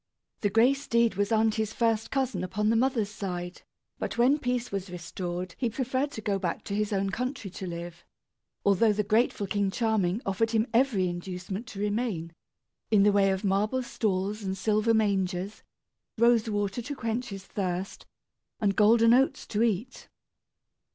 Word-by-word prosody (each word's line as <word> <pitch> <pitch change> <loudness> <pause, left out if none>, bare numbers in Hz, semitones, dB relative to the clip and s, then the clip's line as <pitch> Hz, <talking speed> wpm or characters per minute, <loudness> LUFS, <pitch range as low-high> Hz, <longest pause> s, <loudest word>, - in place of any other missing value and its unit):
The 205 - +1
gray 230 +6 +5
steed 235 -4 +1
was 200 +2 -1
aunty's 220 -1 +1
first 225 -2 +1
cousin 265 -5 -1
upon 210 +4 0
the - - +2
mother's 230 -4 +1
side; 180 -4 -5 0.4
but - - -4
when 260 +5 +4
peace 250 -2 -2
was 195 -1 -4
restored 175 0 -5
he 245 - +1
preferred 260 +4 -1
to 220 - -6
go 200 -2 -1
back 175 -3 -3
to 200 - -4
his 210 0 -1
own 195 -1 0
country 250 -3 -4
to 185 - -6
live, 170 0 -7 0.6
although 200 +2 +4
the 210 +1 0
grateful 215 0 +1
King 200 0 0
Charming 210 -3 0
offered 195 +4 0
him 225 -1 +2
every 230 -7 +3
inducement 185 +5 -5
to 210 -5 -8
remain, 205 -6 -2 0.6
in 210 -3 +5
the 205 - +5
way 200 -1 +4
of 190 +1 -1
marble 210 +6 +1
stalls 205 -2 -1
and 190 -1 -3
silver 215 +3 +2
mangers, 195 -2 0 0.6
rose 235 -1 +4
water 205 +2 -1
to 285 +5 -5
quench 235 0 -2
his 195 -1 -8
thirst, 185 -1 -4 0.5
and 200 -2 +1
golden 230 +2 +5
oats 265 +2 +2
to 215 - -2
eat. 230 +2 -1
210 Hz, 165 wpm, -28 LUFS, 195-230 Hz, 0.6 s, gray